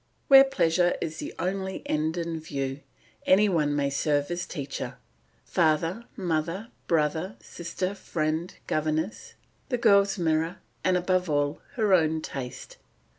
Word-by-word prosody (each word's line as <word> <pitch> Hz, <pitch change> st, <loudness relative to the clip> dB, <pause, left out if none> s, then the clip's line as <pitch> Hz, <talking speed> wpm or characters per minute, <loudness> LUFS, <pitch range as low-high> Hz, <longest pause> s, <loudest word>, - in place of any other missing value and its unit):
Where 270 Hz, -1 st, +10 dB
pleasure 175 Hz, -10 st, +2 dB
is 160 Hz, -1 st, -4 dB
the -, -, -5 dB
only 190 Hz, +2 st, -3 dB
end 155 Hz, +2 st, 0 dB
in 165 Hz, -1 st, -2 dB
view, 135 Hz, -3 st, -4 dB, 0.5 s
any 200 Hz, +3 st, +6 dB
one 150 Hz, -6 st, +1 dB
may 140 Hz, -1 st, +1 dB
serve 145 Hz, +2 st, 0 dB
as 175 Hz, 0 st, -3 dB
teacher 140 Hz, -2 st, -5 dB, 0.5 s
father, 165 Hz, +7 st, +1 dB
mother, 175 Hz, +4 st, -2 dB, 0.2 s
brother, 160 Hz, +4 st, +1 dB
sister, 180 Hz, +3 st, -4 dB
friend, 160 Hz, -3 st, -2 dB
governess, 155 Hz, +6 st, -2 dB, 0.3 s
the 250 Hz, -, +1 dB
girl's 200 Hz, -3 st, +4 dB
mirror, 165 Hz, +1 st, 0 dB, 0.3 s
and 185 Hz, -1 st, +3 dB
above 180 Hz, 0 st, +1 dB
all 145 Hz, 0 st, 0 dB
her 215 Hz, -4 st, +2 dB
own 160 Hz, -3 st, +3 dB
taste. 130 Hz, -4 st, -7 dB
165 Hz, 130 wpm, -27 LUFS, 155-185 Hz, 0.5 s, Where